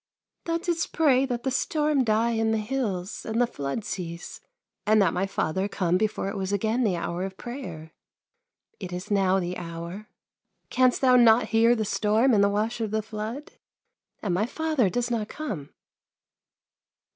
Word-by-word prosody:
" - - -57
Thou 335 0 0
didst 335 -1 -2
pray 275 -4 +3
that 240 -2 -3
the 265 - 0
storm 295 +1 +1
die 225 +1 +2
in 225 -1 +1
the 220 - +2
hills, 215 -5 -3
and 225 +1 -2
the 245 - +5
flood 145 -1 -4
cease, 170 -2 -6 0.4
and 215 +1 +4
that 190 -5 +3
my 190 +2 0
father 190 0 -1
come 180 -3 0
before 210 0 0
it 195 - -4
was 190 -1 -2
again 220 +5 +1
the 200 -6 +2
hour 170 +1 -3
of 190 0 -5
prayer. 175 - -7 0.9
It 185 -3 -6
is 180 +3 -6
now 195 -1 +3
the 180 0 -3
hour. 170 +4 -7 0.6
Canst 255 -1 +3
thou 255 -2 +6
not 235 -1 +5
hear 230 +1 +4
the 220 -2 -1
storm 220 +5 +2
and 200 -2 +5
the 200 - +4
wash 220 +3 -1
of 220 - -1
the 215 +1 -1
flood? 220 +6 -6 0.7
And 195 -5 0
my 205 +6 +1
father 310 -7 +1
does 245 +3 -1
not 220 -3 -1
come 200 - -5
215 Hz, 180 wpm, -26 LUFS, 190-245 Hz, 0.9 s, thou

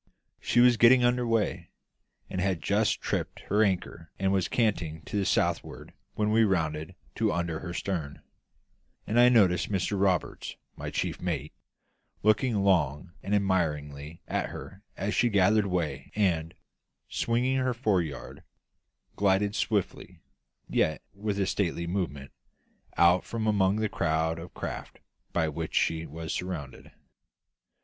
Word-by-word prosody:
She 120 - +3
was 120 -1 +6
getting 125 +2 +6
under 120 0 +2
way, 115 -2 0 0.6
and 95 - -3
had 95 -3 0
just - - +1
tripped - - -3
her 105 +2 +1
anchor 90 -4 -2
and 95 0 +1
was 95 -2 +1
canting 85 -9 -1
to - - -7
the 100 -2 +1
southward - - -1 0.2
when 105 0 +1
we 115 +1 +5
rounded 80 -6 -1 0.2
to - - +2
under 85 -1 -2
her 90 - -6
stern; 85 -6 -4 0.8
and 115 +3 +1
I 120 0 +8
noticed 95 -7 +4
Mr 95 0 0
Roberts, 95 -4 0 0.2
my - - -5
chief - - -3
mate, - - -3 0.7
looking 110 0 +2
long 85 -3 +1
and 100 - 0
admiringly 75 -6 -1
at - - -1
her 95 +1 -9 0.2
as 100 +2 -2
she 120 - +3
gathered 105 0 +3
way 80 -7 -2
and, 85 -6 0 0.5
swinging 125 +3 0
her 130 -1 0
fore 105 -7 +2
yard, 75 -4 -7 0.7
glided 100 +1 +2
swiftly, 105 -2 -2 0.5
yet 80 -1 0
with 100 0 -3
a 100 - +2
stately 85 -3 -1
movement, 85 -7 -3 0.7
out 90 +1 +5
from 115 -1 -4
among 100 -2 +3
the 110 0 0
crowd 80 -3 0
of 85 +1 -10
craft - - -6 0.3
by 80 -2 +1
which 80 +1 -4
she 80 0 +1
was 80 +2 -5
surrounded. 85 -7 -5
95 Hz, 140 wpm, -28 LUFS, 80-105 Hz, 0.8 s, I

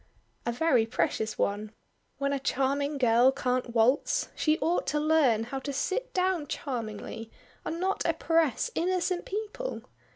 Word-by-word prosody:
"A - - +2
very 245 -3 +2
precious 220 -1 -1
one. 210 +2 -1 0.4
When 280 0 0
a 280 - -1
charming 275 +2 0
girl 245 0 +5
can't 255 -2 -2
waltz, 240 +6 +2
she 310 0 +2
ought 345 +2 0
to 300 - +1
learn 295 -8 +3
how 270 +4 -4
to 280 +2 -4
sit 375 - -2
down 365 -4 0
charmingly, 225 -4 -5 0.3
and 330 - -4
not 380 +2 0
oppress 325 - +1
innocent 365 +1 0
people. 435 +5 -4
280 Hz, 140 wpm, -28 LUFS, 235-330 Hz, 0.4 s, girl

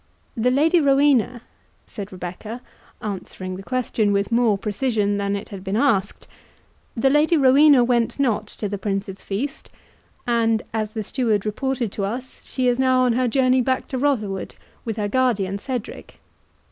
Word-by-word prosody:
"The 240 +1 +2
Lady 315 +6 +3
Rowena," 275 -4 +3 0.4
said 200 -2 -8
Rebecca, 185 +6 -7 0.4
answering 185 -2 -5
the 190 - -8
question 225 -2 0
with 200 +2 0
more 230 -3 +3
precision 210 0 -1
than 200 0 -1
it 200 - -6
had 195 -2 -8
been 195 +1 -2
asked—"The 230 +2 -2
Lady 305 +3 +4
Rowena 275 0 +6
went 240 +1 0
not 225 -6 +1
to 210 - -5
the 200 0 -4
Prince's 195 -1 -3
feast, 255 +9 -4 0.6
and, 230 -2 +1
as 215 -1 -3
the 220 - -2
steward 220 -3 0
reported 240 +1 -2
to 200 - -4
us, 250 +6 -6
she 255 -1 -1
is 245 +1 +2
now 260 -1 +3
on 250 -2 +3
her 250 +1 +1
journey 255 +1 +3
back 260 +1 -1
to 260 - -3
Rotherwood, 215 -9 -1 0.3
with 225 -2 -3
her 210 -1 -1
guardian 205 -5 0
Cedric. 250 -1 -6
230 Hz, 160 wpm, -22 LUFS, 205-260 Hz, 0.6 s, Rowena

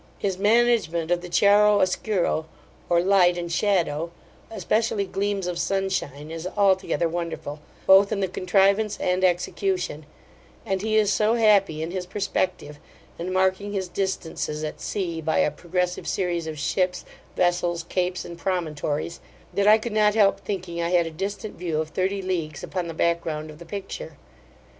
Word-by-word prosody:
His 190 -2 -2
management 210 -7 +2
of 175 0 +2
the 180 - -8
chiaro 205 +3 +5
oscuro, 185 -4 0 0.4
or 170 0 +4
light 180 -1 +4
and 170 -1 -4
shadow, 170 -4 +1 0.4
especially 220 -2 0
gleams 200 0 -2
of 175 -1 -3
sunshine, 180 -7 -2
is 165 +2 -5
altogether 190 -3 +2
wonderful, 165 -3 -4 0.3
both 195 +2 +6
in 210 - 0
the 195 - +1
contrivance 195 +3 +2
and 180 +1 0
execution; 180 -3 0 0.6
and 190 -1 -1
he 215 +1 0
is 210 -2 +3
so 215 +2 +2
happy 200 -8 +3
in 165 - -4
his 185 -1 -4
perspective, 185 -6 -2 0.4
and 175 +2 -3
marking 190 +2 +1
his 190 -2 -2
distances 165 -6 -3
at 155 - -5
sea, 170 -5 -3
by 160 0 0
a - - +3
progressive 180 0 -2
series 175 -3 -1
of 155 -1 -5
ships, 180 +4 -1 0.3
vessels, 175 -1 +1
capes, 180 +1 -2
and 170 0 -9
promontories, 165 -3 -2 0.3
that 200 0 +1
I 215 +1 +8
could 225 0 -5
not 210 -1 +3
help 205 -3 +4
thinking, 180 -4 -4
I 170 - 0
had 175 -1 +3
a 165 - -5
distant 200 +5 -5
view 165 -3 -1
of 155 0 -2
thirty 190 +3 -1
leagues 170 -5 -3
upon 180 -2 -3
the 165 - -6
back 170 +1 +1
ground 155 -1 -5
of 150 - -14
the 170 - -10
picture. 180 -6 -7
180 Hz, 165 wpm, -24 LUFS, 170-200 Hz, 0.6 s, I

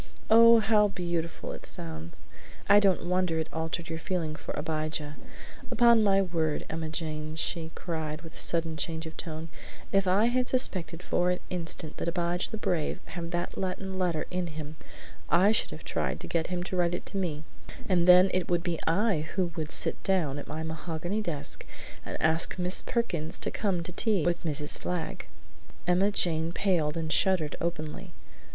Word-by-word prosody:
"Oh, 230 +1 +9
how 210 -1 +4
beautiful 170 -3 -3
it - - -8
sounds! 80 0 -5 0.5
I 205 +1 +8
don't 195 -4 +2
wonder 180 -2 +1
it 160 0 -1
altered 160 +1 -3
your 160 0 -4
feeling 165 -4 -2
for - - -7
Abijah! 155 -1 -3 0.5
Upon 235 -2 +5
my 195 -1 +4
word, 165 -4 -1
Emma 160 0 -3
Jane," 155 -1 -4
she 160 0 0
cried 160 -2 -4
with 165 - -10
a - - -8
sudden 165 -2 +2
change 160 +2 -3
of 160 - -8
tone, 160 -1 -6 0.4
"if 195 -1 +2
I 195 +4 +4
had 250 +1 +1
suspected 180 -9 +1
for 180 0 +1
an 180 - 0
instant 165 -3 -4
that - - -3
Abijah 175 +1 -1
the 220 - -5
Brave 175 -7 -1
had 170 -2 -5
that 175 0 -3
Latin 190 0 -3
letter 175 -4 0
in 180 -1 -1
him 155 -1 -7 0.5
I 185 +5 +5
should 220 - +1
have - - -9
tried - - -2
to - - -6
get 165 -1 0
him 180 -1 -2
to 185 - -4
write 175 -1 +2
it - - -6
to 200 - -3
me; 160 -5 -2 0.4
and 180 -3 +2
then 180 +1 +8
it 185 -2 0
would 175 -1 +1
be 170 -2 -1
I 170 -2 +2
who 180 -3 +1
would 155 -1 -4
sit - - +1
down 160 -8 +1
at - - -8
my 160 +1 -4
mahogany 165 +5 -3
desk 165 -8 -2 0.4
and - - -6
ask 160 +3 +2
Miss 180 0 +1
Perkins 170 -10 -1
to - - +1
come 190 -5 -1
to 180 - -6
tea 195 -3 +1
with 175 0 0
Mrs. 150 -2 +2
Flagg." 180 -3 -4 0.6
Emma 180 +3 +3
Jane 165 -4 +2
paled 170 -7 +1
and 160 -1 -1
shuddered 175 -6 +2
openly. 155 -3 -4
170 Hz, 185 wpm, -29 LUFS, 160-185 Hz, 0.6 s, Oh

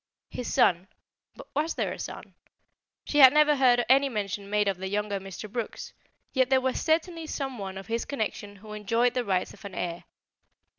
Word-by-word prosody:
His 245 - -5
son 180 +1 +3 0.5
but - - -11
was 305 +4 -1
there - - -1
a - - -10
son? - - -8 0.7
She 295 - 0
had 265 -2 +10
never 300 0 +5
heard 245 -3 +4
any 275 +2 +5
mention 200 -3 -4
made 210 0 +1
of 190 -2 -1
a 190 - -3
younger 205 0 -2
Mr. 195 +2 -8
Brooks, 230 +2 -5 0.4
yet 260 -2 +2
there 265 -1 +4
was 260 0 -1
certainly 330 0 0
some 270 -5 -4
one 190 -1 -6
of 195 - -8
his 230 +1 -2
connection 210 -5 -4
who 210 +2 -11
enjoyed 230 +4 +1
the 250 -1 0
rights 190 -4 -1
of - - -16
an 200 -2 -8
heir. 170 -1 -4
230 Hz, 195 wpm, -27 LUFS, 200-265 Hz, 0.7 s, had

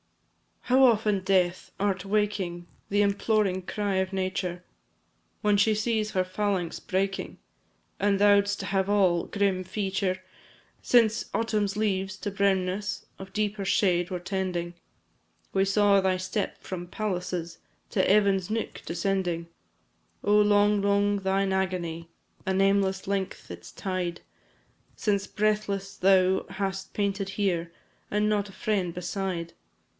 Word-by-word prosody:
How 260 +1 +5
often, 215 -4 +3
Death! 185 -2 +1
art 195 -1 0
waking 195 -4 -1 0.2
The 205 +1 +2
imploring 200 -2 +1
cry 205 +1 -2
of 190 0 0
Nature! 185 -2 -2 0.8
When 210 -1 +3
she 215 +1 +3
sees 215 0 0
her 185 - +1
phalanx 185 -2 -2
breaking, 195 +1 -2 0.6
As 200 0 +2
thou'dst 205 0 +4
have 195 0 0
all 185 -4 +3
grim 195 -2 0
feature! 190 -1 -2 0.6
Since 225 -2 +3
Autumn's 210 -3 0
leaves 195 -3 0
to 205 - -4
brownness, 195 0 0
Of 190 0 -10
deeper 210 -1 -1
shade 180 -3 +2
were 180 -2 -3
tending, 180 -2 -3 0.8
We 195 0 +3
saw 200 0 +4
thy 190 -1 +1
step, 185 +3 -3
from 175 -2 -6
palaces, 180 -4 -3 0.3
To 190 - +2
Evan's 195 -2 +3
nook 225 +1 -3
descending. 175 -1 -1 0.7
Oh, 205 +1 +4
long, 205 0 +4
long 200 0 +2
thine 195 0 +1
agony! 175 -3 -2 0.4
A 190 - 0
nameless 195 0 +2
length 195 - -3
its 85 -1 -9
tide; 180 - -3 0.7
Since 200 -2 0
breathless 205 -2 -1
thou 190 0 +3
hast 195 -1 -4
panted 200 -1 -1
here, 180 -4 -1 0.4
And 210 +1 +1
not 205 -1 0
a - - -13
friend 190 -6 -1
beside. 180 -1 -3
195 Hz, 125 wpm, -27 LUFS, 185-205 Hz, 0.8 s, How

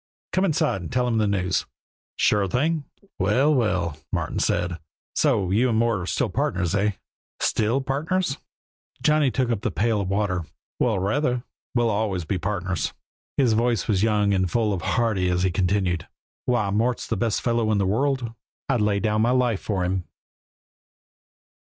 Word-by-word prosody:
Come 185 +1 +3
inside 155 - +1
and 85 - -7
tell 125 0 +1
him 115 -2 +1
the 105 - +2
news." 95 -2 0 0.5
"Sure 105 -2 +2
thing." 145 - 0 0.3
"Well, 125 +11 +3
well!" 90 - 0
Martin - - -2
said. 85 0 0 0.3
"So 95 -2 +2
you 120 +6 +3
and 110 - +1
Mort 115 -2 +2
are 90 - -4
still - - 0
partners, 90 -1 0
eh?" 100 +1 +2 0.5
"Still 115 +5 +1
partners?" 145 +4 -1 0.6
Johnny 150 -2 +4
took 125 -1 0
up 110 -4 -1
the - - 0
pail 110 -1 +1
of 95 - -3
water. 95 -4 0 0.3
"Well, 115 -5 +2
rather! 125 +5 0 0.3
We'll 120 -2 +3
always 100 -5 -1
be 95 +2 -1
partners." 90 -1 -2 0.4
His 125 -5 +4
voice 115 -3 +1
was 100 -4 +2
young 105 -2 +2
and 95 -2 +1
full 110 +2 +1
and 90 - -3
hearty 105 -6 +1
as 90 0 +1
he 95 - +2
continued: 90 -2 0 0.4
"Why, 110 -5 +1
Mort's 115 +4 0
the - - -2
best 115 -3 0
fellow 115 -2 +1
in 105 - +2
the 100 - +2
world. 120 +3 0 0.3
I'd 125 -5 +1
lay 105 -1 +2
down 110 0 +1
my 115 - +3
life 125 -5 +2
for 95 -4 -1
him." 90 -1 -1
105 Hz, 170 wpm, -24 LUFS, 95-125 Hz, 0.6 s, Johnny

